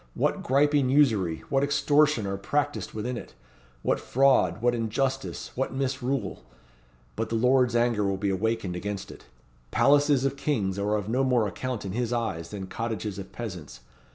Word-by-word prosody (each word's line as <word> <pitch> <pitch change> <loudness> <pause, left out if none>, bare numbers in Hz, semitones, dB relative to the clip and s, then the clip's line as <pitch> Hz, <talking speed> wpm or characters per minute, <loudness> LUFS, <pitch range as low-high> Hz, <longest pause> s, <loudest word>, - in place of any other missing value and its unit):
What - - 0
griping 140 0 +3
usury, 110 - +2
what 135 0 +2
extortion 145 -3 +3
are 100 0 -2
practised 145 +9 -2
within 120 +3 -3
it! - - -10 0.5
What - - +1
fraud, 130 -9 +3
what 120 +1 +2
injustice, 130 +4 -2
what 130 +1 -2
misrule! 130 - -2 0.7
But 115 - -2
the 115 - -1
Lord's 125 +1 +3
anger 120 -3 +2
will 100 -1 0
be 100 0 0
awakened 100 -1 -1
against 100 +2 -5
it. - - -14 0.4
Palaces 145 - +4
of 135 0 -1
kings 105 -10 -1
are 105 +1 +1
of 105 -2 -2
no 125 +4 +1
more 125 -5 +2
account 125 +1 -4
in 95 - -4
His 120 +3 -2
eyes 110 -9 -2
than 100 -2 -6
cottages 110 -1 -4
of 95 - -8
peasants. 85 - -7
120 Hz, 165 wpm, -27 LUFS, 100-135 Hz, 0.7 s, Palaces